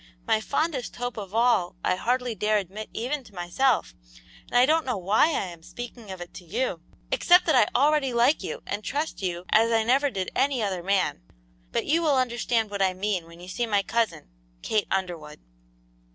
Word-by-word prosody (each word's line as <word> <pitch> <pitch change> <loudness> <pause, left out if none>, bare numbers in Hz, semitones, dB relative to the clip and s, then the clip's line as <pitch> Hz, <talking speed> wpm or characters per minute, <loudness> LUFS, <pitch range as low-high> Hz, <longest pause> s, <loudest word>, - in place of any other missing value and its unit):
"My 220 - +2
fondest 280 +1 -2
hope 245 0 -4
of 200 -1 -7
all 225 -7 +2
I - - +3
hardly 245 +4 0
dare 215 +1 +1
admit 205 +2 -5
even 265 +5 -3
to 210 -5 -18
myself, 180 +9 +1 0.5
and - - 0
I 245 - +7
don't 320 +3 +3
know 250 -5 -2
why 195 +8 +3
I 315 -10 -1
am 170 -2 -11
speaking 235 +3 -9
of 190 -1 -7
it 175 0 -9
to 180 - -10
you, 175 0 -2 0.3
except 360 +1 +5
that 315 - +3
I 240 -5 +5
already 290 -1 +3
like 240 +5 +3
you 475 - -5
and 210 - -4
trust 295 +2 -3
you 175 -2 -3
as 225 +2 +4
I 225 -1 +3
never 270 +5 +3
did 190 -7 -4
any 265 -3 +1
other 190 -3 -2
man; 185 - 0 0.5
but - - -1
you 325 +3 +2
will 300 -5 +3
understand 235 -3 0
what 200 -1 -3
I 190 -1 +2
mean 190 -3 -2
when 170 0 -14
you 180 - -11
see 235 +6 -2
my 205 -2 +2
cousin, 230 - -1 0.4
Kate 215 -2 0
Underwood." 175 -6 -3
220 Hz, 200 wpm, -26 LUFS, 190-255 Hz, 0.5 s, I